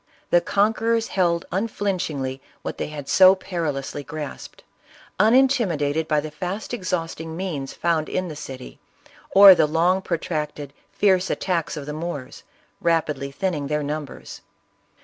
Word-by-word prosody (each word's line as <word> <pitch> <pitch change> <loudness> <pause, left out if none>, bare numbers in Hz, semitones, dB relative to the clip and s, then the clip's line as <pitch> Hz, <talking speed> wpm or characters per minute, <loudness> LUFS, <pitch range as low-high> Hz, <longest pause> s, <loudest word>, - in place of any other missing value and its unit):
The 175 - +5
conquer 220 +5 +1
ors 225 0 -1
held 170 -3 +1
unflinchingly 180 -10 -2 0.2
what - - -5
they - - -2
had 150 -2 -8
so 185 +4 +7
perilously 150 -7 -4
grasped, 155 -1 -8 0.6
unintiinidated 205 - +3
by 150 -1 +2
the 155 +1 -7
fast 185 +9 -5
exhausting 165 -6 -3
means 160 -8 -4
found 165 -3 0
in 185 - -2
the 155 - -7
city, 130 -3 -9 0.5
or 195 0 +10
the 155 - +3
long 170 +5 +2
protracted, 150 -5 -3 0.2
fierce 190 -2 +2
attacks 170 -4 -1
of 145 - -6
the 150 - -5
Moors, 155 -4 -6 0.4
rapidly 155 -5 0
thinning 150 -1 -2
their 150 +1 -1
numbers. 150 0 -6
165 Hz, 135 wpm, -23 LUFS, 150-190 Hz, 0.6 s, or